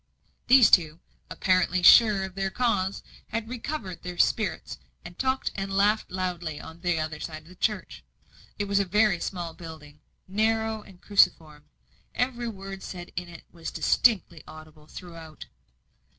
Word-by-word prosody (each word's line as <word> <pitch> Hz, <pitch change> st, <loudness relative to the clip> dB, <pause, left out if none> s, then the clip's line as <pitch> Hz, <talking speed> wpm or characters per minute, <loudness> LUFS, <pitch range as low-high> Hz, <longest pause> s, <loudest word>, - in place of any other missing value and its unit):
These 255 Hz, -2 st, +7 dB
two, 160 Hz, -2 st, +4 dB, 0.3 s
apparently 185 Hz, -1 st, +1 dB
sure 210 Hz, 0 st, +7 dB
of 190 Hz, -1 st, -6 dB
their 195 Hz, 0 st, -2 dB
cause, 200 Hz, -4 st, -1 dB, 0.2 s
had 225 Hz, 0 st, -4 dB
recovered 240 Hz, -, -5 dB
their 180 Hz, 0 st, -7 dB
spirits, 195 Hz, -3 st, 0 dB, 0.3 s
and 175 Hz, -, -10 dB
talked 260 Hz, 0 st, 0 dB
and 195 Hz, 0 st, -4 dB
laughed 205 Hz, +3 st, +2 dB
loudly 175 Hz, -4 st, -4 dB
on 160 Hz, +1 st, -11 dB
the 175 Hz, -2 st, 0 dB
other 155 Hz, -1 st, -4 dB
side 155 Hz, -1 st, -7 dB
of 160 Hz, -, -18 dB
the -, -, -13 dB
church. 210 Hz, +1 st, -2 dB, 0.5 s
It 205 Hz, -, -1 dB
was 200 Hz, 0 st, +1 dB
a -, -, +3 dB
very 210 Hz, 0 st, +2 dB
small 175 Hz, -3 st, -4 dB
building, 155 Hz, -3 st, -11 dB, 0.3 s
narrow 220 Hz, +2 st, 0 dB
and 195 Hz, -3 st, -17 dB
cruciform; 155 Hz, -7 st, +2 dB, 0.5 s
every 245 Hz, -1 st, -1 dB
word 195 Hz, -3 st, -7 dB
said 175 Hz, -2 st, -8 dB
in 180 Hz, 0 st, -4 dB
it 170 Hz, -, -12 dB
was 165 Hz, -2 st, -7 dB
distinctly 190 Hz, -9 st, +2 dB
audible 155 Hz, -1 st, -14 dB
throughout. 165 Hz, -4 st, -11 dB
185 Hz, 150 wpm, -26 LUFS, 165-210 Hz, 0.5 s, These